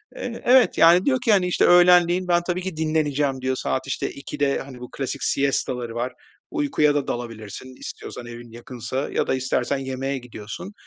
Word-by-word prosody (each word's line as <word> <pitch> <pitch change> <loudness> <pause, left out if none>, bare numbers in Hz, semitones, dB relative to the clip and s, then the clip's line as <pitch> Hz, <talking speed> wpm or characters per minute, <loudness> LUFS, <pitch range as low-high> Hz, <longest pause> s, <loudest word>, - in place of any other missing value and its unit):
Eee, 240 -2 -6
evet, 255 +1 +5
yani, 170 +3 +6
diyor 265 -2 +3
ki, 230 - +4
hani, 185 -3 +3
işte, 180 - +2
"Öğlenleyin 175 0 +5
ben 175 -1 +3
tabii 180 0 -1
ki 185 -3 -5
dinleneceğim." 150 -4 0
diyor, 130 0 0
saat, 130 +1 -2
işte, - - -2
14.00'te 140 0 -2
hani 135 -2 -9
bu 125 - -9
klasik 135 -1 -4
siesta 135 -2 0
'ları 120 -2 -6
var, 125 +2 -2 0.4
uykuya 275 - +1
da 145 -2 -1
dalabilirsin 120 +1 -6
istiyorsan 120 - -8
evin 120 0 -10
yakınsa 120 +3 -5
ya - - 0
da - - +1
istersen 130 +1 -1
yemeğe 135 +1 -3
gidiyorsun. 125 - -8
140 Hz, 180 wpm, -23 LUFS, 125-175 Hz, 0.4 s, yani